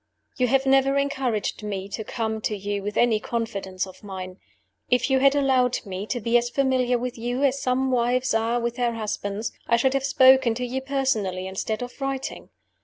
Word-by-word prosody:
"You 250 - +3
have 265 +2 +2
never 270 +1 +4
encouraged 265 -8 -1
me 200 -2 -4
to 220 - -4
come 220 0 -3
to 210 -1 -2
you 200 +1 -3
with 205 +1 -4
any 235 -3 +3
confidences 200 -5 -3
of 190 +1 -14
mine. 185 -2 -7 0.5
If 250 +2 +2
you 265 - +4
had 275 +1 +4
allowed 260 -3 +2
me 195 +1 -5
to 245 - -2
be 235 +2 +3
as 240 0 -3
familiar 255 -1 +1
with 245 -1 -5
you 245 +4 -2
as 275 0 +2
some 260 +1 +1
wives 250 +1 +1
are 225 +2 +1
with 235 +1 -3
their 240 -1 +1
husbands, 210 -1 -3 0.2
I 235 - +4
should 260 +3 +2
have 275 -1 0
spoken 260 -3 +5
to 250 +1 -2
you 260 +2 -3
personally 245 -9 -1
instead 210 +4 -3
of 245 +3 -10
writing. 270 0 -4
240 Hz, 195 wpm, -24 LUFS, 215-265 Hz, 0.5 s, spoken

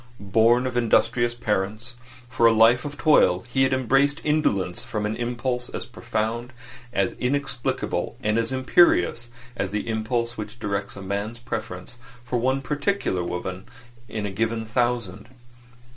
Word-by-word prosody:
Born 120 +3 +5
of 130 -1 -3
industrious 120 0 +2
parents 110 +1 -2 0.3
for 120 -1 +3
a - - +6
life 115 +3 +5
of 145 0 -6
toil, 115 - +4
he 130 +2 0
had 130 0 +4
embraced 135 +3 +2
indolence 100 - +1
from 105 -1 -3
an 105 +1 -1
impulse 120 +1 -2
as - - -5
profound 115 +3 -3 0.4
as 100 -4 +1
inexplicable 130 -1 -2
and 105 +2 +2
as 115 +1 -1
imperious 130 -3 +3 0.3
as 95 - -2
the 105 +3 -3
impulse 115 +1 -1
which 105 +2 -6
directs 100 -3 -3
a 100 - -8
man's 100 +4 -3
preference 115 -2 -6 0.2
for 120 0 -1
one 130 +3 0
particular 145 - -1
woman 90 +2 -5 0.4
in 110 -2 -3
a 100 - -3
given 110 +2 -1
thousand. 115 -4 -1
115 Hz, 145 wpm, -24 LUFS, 105-125 Hz, 0.4 s, a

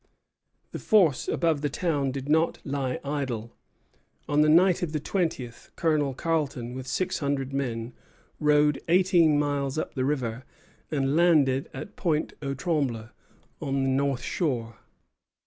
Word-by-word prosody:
The - - -5
force 180 - +3
above 160 -4 +1
the 145 - 0
town 145 -3 -1
did 135 +1 -5
not 160 +2 +2
lie 135 -3 -2
idle. 130 -6 -3 0.7
On 145 +1 +3
the 155 - +4
night 175 +3 +5
of 165 -3 -3
the 155 - 0
twentieth, 145 -8 -3
Colonel 150 -5 +1
Carleton, 140 -7 -2
with 130 0 -7
six 180 +7 -1
hundred 140 -2 -2
men, 120 -3 -3 0.5
rowed 150 -1 +3
eighteen 175 -3 +4
miles 145 -1 -1
up - - -3
the 130 - -1
river, 130 -4 -2 0.5
and 140 -1 0
landed 150 -6 +3
at 205 - -9
Pointe 155 -5 0
aux 140 -1 -3
Trembles, 135 - -1 0.5
on 135 -1 -1
the 135 - +1
north 135 -1 0
shore. 120 -9 -2
145 Hz, 145 wpm, -26 LUFS, 130-160 Hz, 0.7 s, night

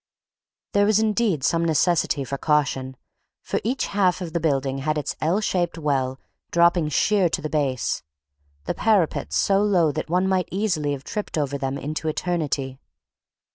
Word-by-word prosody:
There 205 0 +4
was 215 -1 +4
indeed 215 - +1
some 165 +3 +2
necessity 160 -2 +2
for 135 +1 -5
caution, 135 -4 0 0.5
for - - -1
each 250 +6 -1
half 185 -3 +1
of 170 -4 -6
the 170 - +1
building 135 -4 0
had 155 +3 -1
its 150 - -3
L 175 +7 +1
shaped 175 -4 -1
well 135 -4 -1 0.3
dropping 170 -2 +3
sheer 190 +5 +2
to - - -1
the 155 - -5
base, 135 -5 0 0.6
the - - -1
parapets 205 -7 +1
so 195 0 +3
low 180 -7 +3
that 155 +2 -4
one 180 +2 +2
might 185 -1 0
easily 175 -8 0
have 135 -1 -6
tripped 210 -1 -4
over 140 -2 -1
them 135 0 -2
into 155 +3 -4
eternity. 150 -5 -2
160 Hz, 165 wpm, -23 LUFS, 140-185 Hz, 0.6 s, There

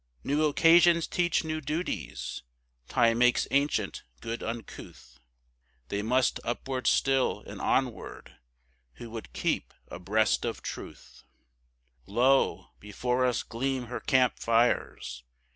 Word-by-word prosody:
New 150 +2 +1
occasions 170 +2 +5
teach 175 -2 0
new 155 0 -3
duties; 155 +5 -4 0.5
Time 115 -1 +3
makes 125 0 +3
ancient 140 +1 0 0.2
good 115 - -5
uncouth; 110 - -8 0.7
They 100 - -2
must 125 +3 +1
upward 130 +2 -3
still, 135 -1 +2
and - - -8
onward, - - -2 0.6
who 115 - -10
would 115 -1 -8
keep - - -2
abreast 105 +4 +1
of - - -4
Truth; - - -9 0.8
Lo, 135 +3 +2
before 125 +5 -1
us 125 - 0
gleam 130 +2 -2
her - - -2
camp 130 -2 +2
fires! 115 - 0
125 Hz, 110 wpm, -28 LUFS, 115-140 Hz, 0.8 s, occasions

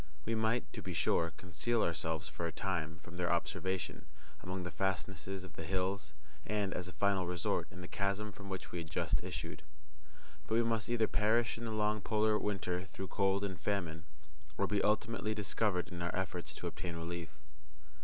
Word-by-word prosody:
We 115 - +1
might, 110 +2 +1
to - - -4
be - - -4
sure, 85 0 +3
conceal 95 +6 +1
ourselves 80 -1 0
for 80 +2 -2
a - - -2
time 80 -3 -1
from 85 +1 -9
their 90 -1 +2
observation 95 -1 0 0.4
among 90 0 -3
the 90 - -3
fastnesses 95 0 -1
of 95 - -10
the 80 - -4
hills, 90 -3 0 0.3
and, 105 0 0
as 90 - -2
a 90 - -7
final 100 -3 +3
resort, 90 -2 +1
in 90 - -9
the 90 - -6
chasm 100 +3 0
from 100 0 -9
which 95 -1 -4
we 85 - -2
had 80 -2 -5
just - - +1
issued; - - -4 0.9
but 110 - +2
we 115 - +6
must 115 -2 +1
either 115 -2 +4
perish 110 +2 +3
in 115 - -5
the 110 - -1
long 105 0 +2
polar 110 0 +3
winter 90 -3 0
through 95 0 -6
cold 100 0 +3
and 95 -3 -3
famine, 85 -5 -1 0.5
or 100 - +3
be 100 0 +2
ultimately 110 +1 +2
discovered 105 -3 +1
in 85 -1 -5
our 85 -1 0
efforts 90 -1 -2
to - - -6
obtain 85 -2 -3
relief. 85 0 -3
95 Hz, 190 wpm, -36 LUFS, 85-105 Hz, 0.9 s, we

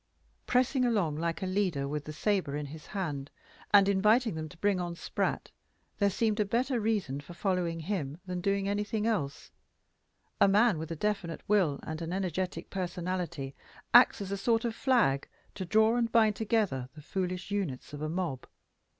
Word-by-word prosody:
Pressing 255 +1 +2
along 205 -11 +1
like 165 +3 -2
a - - 0
leader, 185 -7 0
with 150 0 -3
the 155 - -6
sabre 180 -2 0
in 150 0 -3
his 155 +2 -10
hand, 150 -9 -3 0.4
and 200 -1 +7
inviting 210 +4 +3
them 155 -1 -5
to 175 - -15
bring 200 +1 +1
on 175 -1 -3
Spratt, - - -2 0.5
there 200 -1 +4
seemed 215 +2 0
a - - +5
better 240 +5 0
reason 205 -11 -1
for 170 +4 -12
following 175 -3 -1
him 160 -4 -3
than 180 -1 -3
for 175 - -8
doing 195 0 +1
anything 210 +1 -1
else. 185 -12 -2 0.9
A - - +6
man 205 -2 +4
with 160 0 -5
a 165 - -3
definite 195 -2 -2
will 185 -9 +2
and 155 +1 -5
an 165 0 -4
energetic 185 -2 -3
personality 175 -6 -3 0.4
acts 240 -3 +7
as 195 -1 -5
a 200 - -1
sort 225 +3 +1
of 230 - -1
flag 230 - +2 0.3
to 190 - -5
draw 220 +5 +4
and 235 -2 +1
bind 220 -3 +4
together 200 - 0
the 150 - -11
foolish 180 +2 -3
units 175 -11 -3
of 145 - -6
a 155 - -2
mob. 165 -6 -3
185 Hz, 185 wpm, -30 LUFS, 160-210 Hz, 0.9 s, and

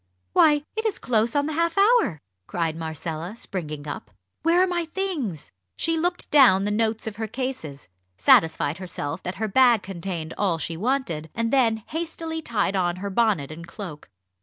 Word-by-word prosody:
"Why, 295 -2 +5
it 440 - -1
is 440 -3 0
close 230 0 +1
on 285 0 +2
the 310 - -2
half 335 +2 0
hour!" 405 - +4 0.3
cried 165 -2 -1
Marcella, 160 +3 -5
springing 155 -9 -5
up. 145 - -6 0.3
"Where 335 +3 +4
are - - +5
my 350 -2 -1
things?" 320 - -3 0.3
She 330 0 +1
looked 350 +2 -2
down 250 -10 +6
the 205 - 0
notes 220 +1 0
of 215 -2 -5
her 220 -1 -3
cases, 215 - -5 0.3
satisfied 160 - +4
herself 170 -3 -4
that 180 - -4
her 220 +1 -2
bag 240 0 +5
contained 170 -3 -5
all 190 -5 +2
she 165 +1 -3
wanted, 205 - -1
and 230 +1 -1
then 225 -5 +3
hastily 325 0 -4
tied 220 -7 0
on 175 -2 +1
her 200 +2 -5
bonnet 195 -10 +1
and 170 +2 -9
cloak. 175 -5 -8
215 Hz, 175 wpm, -24 LUFS, -, 0.3 s, down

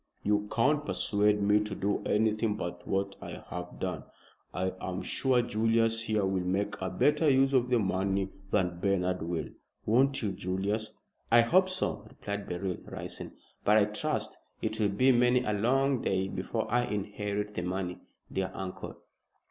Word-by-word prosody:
You 105 0 +1
can't 145 +5 +2
persuade 105 -6 +1
me 105 +1 +5
to 105 -1 -3
do 100 +1 0
anything 110 0 +2
but 85 -4 -5
what 100 0 -1
I - - -8
have 90 0 -6
done. - - -3 0.5
I 95 +1 -1
am 95 0 -3
sure 130 -2 +2
Julius 115 0 +2
here 110 -2 0
will 95 -1 0
make 95 +3 0
a 95 - -1
better 150 - +3
use 135 0 +4
of 125 -2 +3
the 125 - +4
money 95 -1 0 0.2
than 90 -2 0
Bernard 90 -1 +1
will. 85 0 -3 0.4
Won't 130 +4 +3
you, 105 - 0
Julius?" 100 +4 -2 0.4
"I 120 0 +8
hope 185 +10 +4
so," 185 0 -2
replied 100 0 -5
Beryl, 90 +1 -2
rising; - - -7 0.3
"but 105 +1 +5
I 105 - +5
trust 105 0 -2 0.2
it 110 - -3
will 105 -2 +3
be 130 +7 +4
many 125 0 +4
a 105 - 0
long 130 +5 +2
day 95 0 0
before 100 +4 -2
I 120 +1 +3
inherit 105 0 -3
the 90 - -2
money, 90 0 -3 0.3
dear 95 -1 -1
uncle." 95 -1 -6
105 Hz, 165 wpm, -30 LUFS, 95-115 Hz, 0.5 s, I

